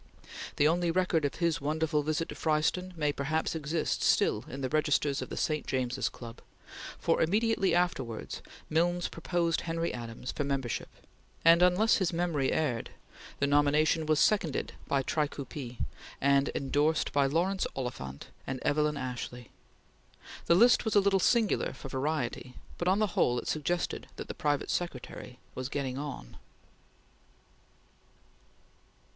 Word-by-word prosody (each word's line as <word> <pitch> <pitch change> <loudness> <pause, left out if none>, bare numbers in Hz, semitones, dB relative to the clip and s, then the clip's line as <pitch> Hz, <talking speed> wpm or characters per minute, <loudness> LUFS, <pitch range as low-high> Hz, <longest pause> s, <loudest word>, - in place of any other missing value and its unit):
The 145 - +4
only 170 +2 +2
record 170 -3 +2
of 140 - -2
his 170 -4 0
wonderful 155 +1 0
visit 155 +2 -1
to - - -6
Fryston 160 +4 0
may 150 -2 +1
perhaps 155 +3 -1
exist 160 0 -1
still 105 - +2
in 135 +2 -7
the 130 - -1
registers 150 -1 +1
of - - -6
the - - -6
St. 155 -1 -1
James's 130 0 -1
Club, 115 -1 -10 0.6
for - - +1
immediately 205 +3 +2
afterwards 170 -10 -1 0.3
Milnes 175 +2 +1
proposed 170 0 -1
Henry 165 0 -2
Adams 120 0 -6
for 145 - -2
membership, 135 -4 -2 0.6
and 165 +1 +7
unless 180 +5 +5
his 190 -4 +1
memory 165 -5 0
erred, 130 -7 -1 0.5
the 140 - +1
nomination 145 +2 +3
was 155 -1 +3
seconded 180 -9 +1
by 135 -1 +1
Tricoupi 140 -4 -3 0.4
and 140 0 +3
endorsed 145 +3 +1
by 140 -1 +3
Laurence 180 +7 +1
Oliphant 70 - -5 0.2
and 135 -1 -3
Evelyn 150 0 +1
Ashley. 125 -2 -6 1.0
The 170 - +6
list 240 +6 +6
was 220 - -1
a - - +8
little 195 -1 +3
singular 225 +2 +2
for 135 - -9
variety, 130 -2 -2 0.2
but 175 - -1
on 190 +2 +4
the 215 -4 0
whole 120 - +2
it - - -4
suggested 170 +3 -1
that - - -7
the - - -5
private 145 -1 -1
secretary 130 -6 -4 0.2
was 130 +1 -4
getting 135 -2 -3
on. 140 - -7
150 Hz, 145 wpm, -30 LUFS, 135-170 Hz, 1.0 s, a